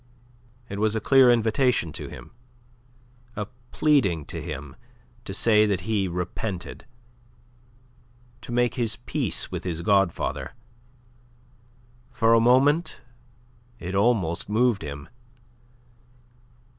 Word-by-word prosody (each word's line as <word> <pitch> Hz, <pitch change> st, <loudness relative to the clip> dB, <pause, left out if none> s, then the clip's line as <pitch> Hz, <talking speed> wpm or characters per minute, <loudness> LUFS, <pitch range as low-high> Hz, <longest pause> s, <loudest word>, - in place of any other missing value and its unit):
It 100 Hz, -2 st, -6 dB
was 110 Hz, +1 st, +1 dB
a -, -, +1 dB
clear 130 Hz, +3 st, +5 dB
invitation 115 Hz, -, +1 dB
to -, -, -6 dB
him, -, -, -11 dB, 1.0 s
a 105 Hz, -, -3 dB, 0.3 s
pleading 100 Hz, -, +2 dB
to 85 Hz, -, -5 dB
him 75 Hz, -3 st, -7 dB, 0.5 s
to -, -, -6 dB
say 105 Hz, -2 st, +4 dB
that 100 Hz, -3 st, -1 dB
he 100 Hz, 0 st, -1 dB
repented, 90 Hz, +3 st, -5 dB, 1.5 s
to -, -, -9 dB
make 120 Hz, 0 st, +1 dB
his 120 Hz, -4 st, -1 dB
peace 120 Hz, -, -2 dB
with -, -, -5 dB
his 85 Hz, -2 st, -4 dB
godfather. 95 Hz, -3 st, 0 dB, 1.6 s
For 115 Hz, -2 st, +3 dB
a 115 Hz, -, +6 dB
moment 135 Hz, +8 st, +3 dB, 0.8 s
it 90 Hz, -3 st, -6 dB
almost 100 Hz, -6 st, +1 dB
moved 115 Hz, -1 st, +2 dB
him. 70 Hz, -2 st, -7 dB
105 Hz, 105 wpm, -25 LUFS, 90-120 Hz, 1.6 s, a